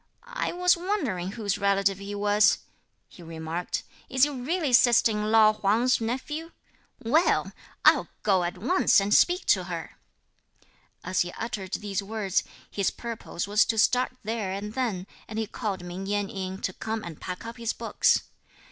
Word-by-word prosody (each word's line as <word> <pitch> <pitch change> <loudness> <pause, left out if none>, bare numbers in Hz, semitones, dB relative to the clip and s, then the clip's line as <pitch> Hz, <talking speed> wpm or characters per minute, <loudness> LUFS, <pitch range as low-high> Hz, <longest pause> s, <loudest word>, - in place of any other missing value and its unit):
"I - - -3
was 360 0 +3
wondering 340 - -2
whose 210 -4 -2
relative 195 -1 +2
he 200 +1 -6
was," 205 +1 +4 0.5
he - - -16
remarked; 165 +1 -4 0.3
"is 260 -1 +2
he 295 - +4
really 285 +2 -2
sister 235 -2 +5
in 210 0 -1
law 215 -1 +6
Huang's 215 +5 +2
nephew? 295 +8 -4 0.5
well, 310 +10 +2 0.3
I'll - - +6 0.2
go 190 -4 +3
at 175 0 -3
once 365 - +3
and 200 +1 0
speak 360 +2 +4
to - - +3
her." - - -7 1.0
As 185 0 0
he 175 - -2
uttered 205 -4 -5
these 205 -1 -2
words, 200 -2 -1 0.3
his 200 -2 +1
purpose 230 -6 -5
was 210 +1 +4
to 225 - -1
start 250 +4 +3
there 215 -3 -2
and 205 +2 -5
then, 225 -8 -2 0.2
and 220 - -7
he 220 - 0
called 200 -4 -4
Ming 180 +2 -6
Yen 205 -1 -1
in, 190 0 -5
to 185 - -1
come 220 +2 -4
and 165 -3 -9
pack 180 +4 -6
up 230 +1 -7
his 230 -1 -1
books. - - +1
210 Hz, 165 wpm, -27 LUFS, 195-240 Hz, 1.0 s, law